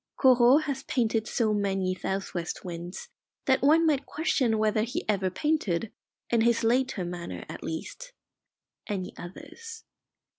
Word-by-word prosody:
Corot 255 +2 +6
has 275 -3 -3
painted 225 -4 0
so 220 -2 +1
many 195 -2 0
south 190 +1 -3
west 175 +1 -4
winds 175 +1 -7 0.4
that 265 -1 +3
one 315 +5 +5
might 285 -3 +1
question 265 -8 +1
whether 215 0 +2
he 245 - -3
ever 195 -3 +1
painted, 215 - 0 0.4
in 235 -1 +3
his 235 0 +3
later 240 -4 +1
manner 170 - -6
at - - -8
least, 475 - -6 0.8
any 195 -4 -3
others. 450 - -10
225 Hz, 140 wpm, -28 LUFS, 190-270 Hz, 0.8 s, Corot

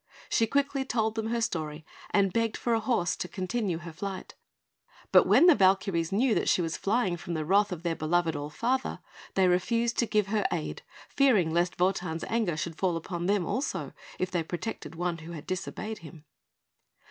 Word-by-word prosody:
She 225 - +2
quickly 280 +1 +1
told 220 -4 0
them 220 0 -2
her 235 +1 -1
story, 155 -6 -3 0.2
and 195 -3 +2
begged 230 -1 0
for 240 - 0
a 225 - +3
horse 220 -6 0
to - - -3
continue 190 -1 -2
her 170 -1 -9
flight; 190 +3 -6 0.8
but - - +6
when - - +6
the 355 - +9
Valkyries 190 - +2
knew 230 +4 +3
that - - +1
she - - +3
was 165 -2 -1
flying 200 -4 0
from 170 +1 -5
the 155 -1 -2
wrath 200 +4 +3
of 175 -2 -5
their 170 -2 0
beloved 165 +1 +1
All 145 +1 -4
Father, 250 - -1 0.4
they 190 -1 +4
refused 230 +6 +1
to 235 - +2
give 210 -2 +2
her 210 -1 +1
aid, 165 -3 -3 0.3
fearing 220 - +3
lest 175 +1 0
Wotan's 180 -3 0
anger 220 -9 0
should 165 0 -4
fall 180 -3 +1
upon 175 +1 -4
them 200 -3 +2
also, 265 - -2 0.2
if 185 0 -2
they 175 -2 0
protected 170 -1 -5
one 175 0 -2
who 165 +2 -9
had 155 -3 -8
disobeyed 205 +4 -4
him. 160 -1 -13
185 Hz, 195 wpm, -28 LUFS, 170-225 Hz, 0.8 s, the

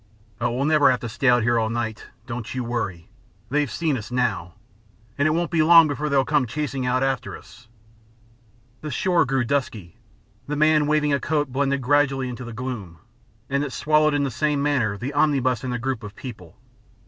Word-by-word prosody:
"Oh, 120 0 0
we'll 125 +4 -1
never 150 -2 +5
have 125 -1 +1
to 120 - -4
stay 120 +5 -2 0.2
here 120 0 +2
all 110 0 0
night! 115 -1 -4 0.2
Don't 115 -1 -6
you 130 - -2
worry. 110 -8 -4 0.4
They've 145 -1 +1
seen 155 +4 -1
us 110 - -8
now, 105 -9 -1 0.6
and 140 +2 +2
it - - +2
won't 170 +2 -1
be 165 -2 +2
long 165 0 +7
before 150 +1 -2
they'll 135 -2 +2
come 145 -4 +1
chasing 135 0 -3
out 130 +1 +1
after 135 -3 -2
us." 115 +3 -17 1.1
The 155 - -5
shore 175 +4 +2
grew 135 0 0
dusky. 115 - -3 0.5
The 150 - -2
man 155 0 +3
waving 150 -1 +2
a 140 - +2
coat 145 -2 -1
blended 140 0 0
gradually 135 -1 +2
into 125 0 -7
this 120 -2 -8
gloom, 110 -9 -6 0.5
and 140 +1 0
it 145 - -4
swallowed 155 0 +2
in 145 - +1
the 135 - -1
same 145 +3 0
manner 125 -9 0
the 130 +7 -5
omnibus 135 -5 +1
and 130 - -3
the 125 - -1
group 125 -1 -3
of 105 -1 -9
people. 105 -10 -10
130 Hz, 195 wpm, -23 LUFS, 120-145 Hz, 1.1 s, long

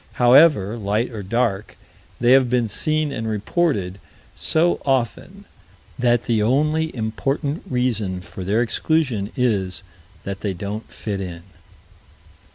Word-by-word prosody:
However, 120 - +5
light 105 +4 -1
or 110 -3 -6
dark, 105 0 -1 0.4
they 120 +1 +3
have 130 -1 +5
been 125 -2 +1
seen 155 +7 0
and 115 -5 -4
reported 105 - -1 0.3
so 170 +2 +1
often 135 - -2 0.5
that 120 -1 +2
the 115 -3 +1
only 150 +7 +1
important 135 +7 -2
reason 110 -7 -1
for 90 +1 -9
their 105 +6 +1
exclusion 120 -4 0
is 100 -8 0 0.4
that 100 0 -5
they 100 -3 -3
don't 105 +4 -6
fit 100 -3 -4
in. 85 -3 -7
115 Hz, 125 wpm, -21 LUFS, 100-135 Hz, 0.5 s, However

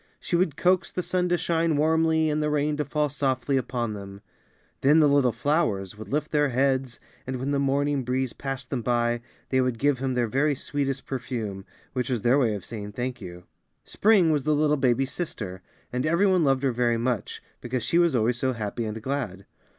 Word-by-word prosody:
She - - -2
would 170 -4 +1
coax 180 0 +2
the 180 - -3
sun 180 0 0
to 175 - +2
shine 165 -2 +1
warmly 160 +1 +3
and 150 +1 0
the 150 - 0
rain 150 0 +1
to 150 - -1
fall 150 -1 0
softly 135 -1 -1
upon 120 -3 -1
them. 100 -1 -9 0.6
Then 145 +4 +5
the 150 - +6
little 140 -3 +4
flowers 115 - 0
would 110 +1 -10
lift 150 +2 -1
their 145 -1 +2
heads, 130 -1 0 0.3
and 130 - -2
when 130 +3 -2
the 140 - +1
morning 140 0 +1
breeze 130 0 -1
passed 135 -2 -6
them 130 -4 -1
by, 120 0 0 0.3
they 130 -1 +2
would 125 -2 0
give 140 +1 +1
him 130 -1 -1
their 120 -1 +2
very 140 +6 +1
sweetest 135 -1 -3
perfume, 115 -7 -4 0.3
which 125 -2 -2
was 120 -5 -1
their 125 +4 +4
way 115 -6 +2
of 100 - -7
saying 105 -2 -7
thank 125 +2 -4
you. 90 -2 -9 0.4
Spring 200 -6 +3
was 145 -3 +1
the 155 +1 +2
little 150 0 +3
baby 130 -1 +2
sister, 105 - -5 0.3
and 125 0 0
every 170 +6 +2
one 185 -3 +3
loved 135 -2 +2
her 135 - +2
very 120 -1 +1
much, 120 -3 -2 0.2
because 120 -1 -3
she 165 +9 +2
was 170 -5 +3
always 120 +1 +1
so 130 0 +1
happy 115 0 -3
and 110 +1 -4
glad. 120 -9 -3
130 Hz, 210 wpm, -26 LUFS, 120-150 Hz, 0.6 s, the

